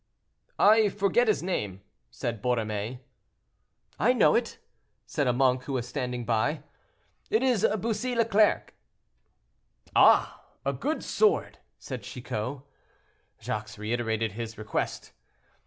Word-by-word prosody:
"I 215 Hz, 0 st, +5 dB
forget 200 Hz, +4 st, +2 dB
his 215 Hz, -5 st, +1 dB
name," 105 Hz, -, -3 dB, 0.3 s
said 120 Hz, -3 st, -4 dB
Borromée. 115 Hz, 0 st, -2 dB, 1.0 s
"I -, -, +4 dB
know -, -, +4 dB
it," -, -, 0 dB, 0.5 s
said -, -, -1 dB
a -, -, +4 dB
monk 130 Hz, 0 st, +2 dB
who 140 Hz, -, -4 dB
was 125 Hz, -2 st, -2 dB
standing 125 Hz, -3 st, -3 dB
by. 110 Hz, -2 st, 0 dB, 0.7 s
"It 220 Hz, +4 st, +2 dB
is 250 Hz, -6 st, +3 dB
Bussy 235 Hz, +4 st, -2 dB
Leclerc." 220 Hz, -2 st, +2 dB, 1.2 s
"Ah! -, -, +5 dB, 0.2 s
a -, -, +1 dB
good 310 Hz, +2 st, -2 dB
sword," 430 Hz, -1 st, +1 dB, 0.2 s
said 130 Hz, -3 st, -7 dB
Chicot. 125 Hz, +4 st, -5 dB, 0.8 s
Jacques 105 Hz, 0 st, -5 dB
reiterated 110 Hz, 0 st, -1 dB
his 110 Hz, +1 st, -6 dB
request. 110 Hz, 0 st, -3 dB
125 Hz, 115 wpm, -28 LUFS, -, 1.2 s, I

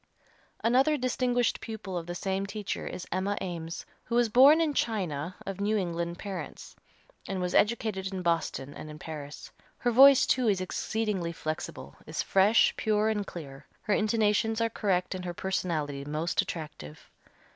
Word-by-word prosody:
Another 265 Hz, +6 st, +4 dB
distinguished 250 Hz, -1 st, 0 dB
pupil 215 Hz, -4 st, -6 dB
of 170 Hz, -1 st, -4 dB
the 175 Hz, -, -4 dB
same 195 Hz, +2 st, -2 dB
teacher 205 Hz, -1 st, -4 dB
is 180 Hz, -, -6 dB
Emma 190 Hz, +3 st, -1 dB
Eames, 170 Hz, -2 st, -5 dB, 0.2 s
who 235 Hz, -, -2 dB
was 240 Hz, -1 st, +3 dB
born 270 Hz, +8 st, +7 dB
in 320 Hz, -3 st, +1 dB
China 185 Hz, -, -2 dB
of 195 Hz, 0 st, -5 dB
New 215 Hz, +2 st, +1 dB
England 170 Hz, -2 st, -2 dB
parents, 195 Hz, -1 st, -7 dB, 0.5 s
and 195 Hz, -1 st, -3 dB
was 180 Hz, 0 st, -2 dB
educated 205 Hz, -3 st, +1 dB
in 185 Hz, -1 st, -4 dB
Boston 165 Hz, -5 st, -1 dB
and 155 Hz, -, -9 dB
in 150 Hz, -, -9 dB
Paris. 150 Hz, -2 st, -8 dB, 0.3 s
Her 245 Hz, -, 0 dB
voice 270 Hz, +3 st, +8 dB
too 255 Hz, -2 st, +2 dB
is 195 Hz, -3 st, +2 dB
exceedingly 190 Hz, -1 st, -2 dB
flexible, 155 Hz, -, -6 dB
is -, -, -2 dB
fresh, 200 Hz, +4 st, +4 dB
pure 215 Hz, 0 st, +2 dB
and 210 Hz, -2 st, -1 dB
clear, 140 Hz, -4 st, -9 dB, 0.2 s
her 210 Hz, -, +1 dB
intonations 215 Hz, +1 st, +2 dB
are 230 Hz, 0 st, +1 dB
correct 190 Hz, -5 st, 0 dB
and 185 Hz, -1 st, -5 dB
her 175 Hz, -1 st, -5 dB
personality 155 Hz, -7 st, -2 dB
most 155 Hz, +4 st, 0 dB
attractive. 150 Hz, -, -8 dB
190 Hz, 160 wpm, -29 LUFS, 170-220 Hz, 0.5 s, voice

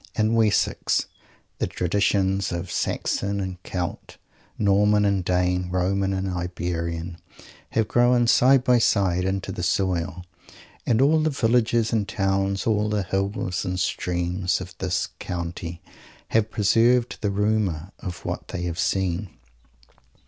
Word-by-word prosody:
In 110 Hz, 0 st, +1 dB
Wessex, 110 Hz, -3 st, +2 dB, 0.5 s
the -, -, 0 dB
traditions 95 Hz, +1 st, 0 dB
of 85 Hz, +1 st, -4 dB
Saxon 100 Hz, +3 st, -1 dB
and 95 Hz, -2 st, -5 dB
Celt, 90 Hz, -1 st, -5 dB, 0.4 s
Norman 105 Hz, +1 st, +3 dB
and 100 Hz, -2 st, +1 dB
Dane, 90 Hz, 0 st, 0 dB
Roman 95 Hz, +2 st, 0 dB
and 95 Hz, 0 st, -2 dB
Iberian, 85 Hz, -2 st, -3 dB, 0.5 s
have 110 Hz, -2 st, +1 dB
grown 120 Hz, +1 st, +3 dB
side 125 Hz, +2 st, +5 dB
by 125 Hz, -1 st, +4 dB
side 95 Hz, -5 st, +2 dB
into 95 Hz, 0 st, -2 dB
the 90 Hz, -, -5 dB
soil, 90 Hz, -1 st, -1 dB, 0.6 s
and 120 Hz, +2 st, +3 dB
all 155 Hz, +3 st, +4 dB
the 155 Hz, -, +2 dB
villages 115 Hz, -3 st, +1 dB
and 105 Hz, -3 st, +1 dB
towns, 95 Hz, 0 st, 0 dB
all 105 Hz, -1 st, +1 dB
the 105 Hz, -2 st, 0 dB
hills 95 Hz, -1 st, -2 dB
and 90 Hz, 0 st, -2 dB
streams, 90 Hz, +1 st, -1 dB
of 95 Hz, 0 st, -9 dB
this 90 Hz, -1 st, -1 dB
country 85 Hz, 0 st, -5 dB, 0.5 s
have 110 Hz, -1 st, +2 dB
preserved 115 Hz, +4 st, +2 dB
the 105 Hz, -, 0 dB
rumour 100 Hz, -4 st, 0 dB
of 90 Hz, -3 st, -7 dB
what -, -, -4 dB
they 90 Hz, -, -5 dB
have 85 Hz, 0 st, -3 dB
seen. 95 Hz, 0 st, 0 dB
95 Hz, 135 wpm, -24 LUFS, 90-105 Hz, 0.6 s, side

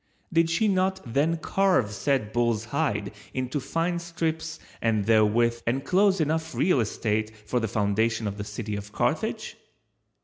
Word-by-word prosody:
Did 165 Hz, 0 st, +4 dB
she 190 Hz, +7 st, +2 dB
not 190 Hz, -1 st, +1 dB
then 145 Hz, +8 st, +1 dB
carve 180 Hz, -, +2 dB
said 110 Hz, -1 st, 0 dB
bull's 120 Hz, -2 st, +1 dB
hide 105 Hz, -3 st, -1 dB, 0.2 s
into 130 Hz, +2 st, -1 dB
fine 170 Hz, +5 st, -1 dB
strips 165 Hz, -2 st, -3 dB, 0.2 s
and 110 Hz, -3 st, +1 dB
therewith 115 Hz, +2 st, +3 dB
enclose 185 Hz, -, +2 dB
enough 160 Hz, +1 st, -1 dB
real 180 Hz, -7 st, +3 dB
estate 110 Hz, -1 st, -1 dB
for 125 Hz, -, 0 dB
the 115 Hz, -, -1 dB
foundation 110 Hz, +2 st, +1 dB
of 100 Hz, -1 st, -3 dB
the -, -, -2 dB
city 105 Hz, 0 st, -5 dB
of 100 Hz, 0 st, -7 dB
Carthage? -, -, -1 dB
120 Hz, 145 wpm, -26 LUFS, 110-165 Hz, 0.2 s, Did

